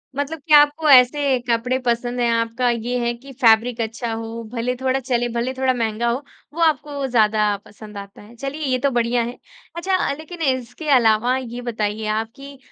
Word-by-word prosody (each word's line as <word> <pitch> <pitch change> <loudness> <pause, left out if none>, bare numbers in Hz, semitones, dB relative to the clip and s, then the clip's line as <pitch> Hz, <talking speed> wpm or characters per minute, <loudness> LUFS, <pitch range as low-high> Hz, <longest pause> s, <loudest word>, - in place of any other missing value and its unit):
मतलब 285 +3 -3
क्या 300 -1 +8
आपको 295 +2 0
ऐसे 265 0 +5
कपड़े 245 +3 +1
पसंद 245 0 -1
हैं, 240 -1 +2
आपका 230 +2 0
ये 240 +1 -1
है 240 0 0
कि 270 +3 -13
फैब्रिक 230 +1 +4
अच्छा 225 +1 -3
हो, 225 +1 -6
भले 245 +1 -1
थोड़ा 260 +1 0
चले, 245 -2 -1
भले 240 +2 -1
थोड़ा 260 0 +1
महँगा 230 -1 -1
हो, 235 - 0 0.4
वो 335 - -4
आपको 290 -3 +1
ज़्यादा 215 -3 +2 0.2
पसंद 210 0 -12
आता 200 0 -10
है। 220 +3 -15
चलिए 275 +5 -5
ये 255 - +2
तो - - +4
बढ़िया 235 +1 +1
है। 240 +2 -6 0.4
अच्छा, 370 -2 0
लेकिन 320 +3 -10
इसके 260 +2 -2
अलावा 235 +1 +3
ये 245 -1 -6
बताइए 215 -2 -3
आप 225 +1 -3
कि, 275 0 -11
245 Hz, 190 wpm, -21 LUFS, 230-270 Hz, 0.4 s, क्या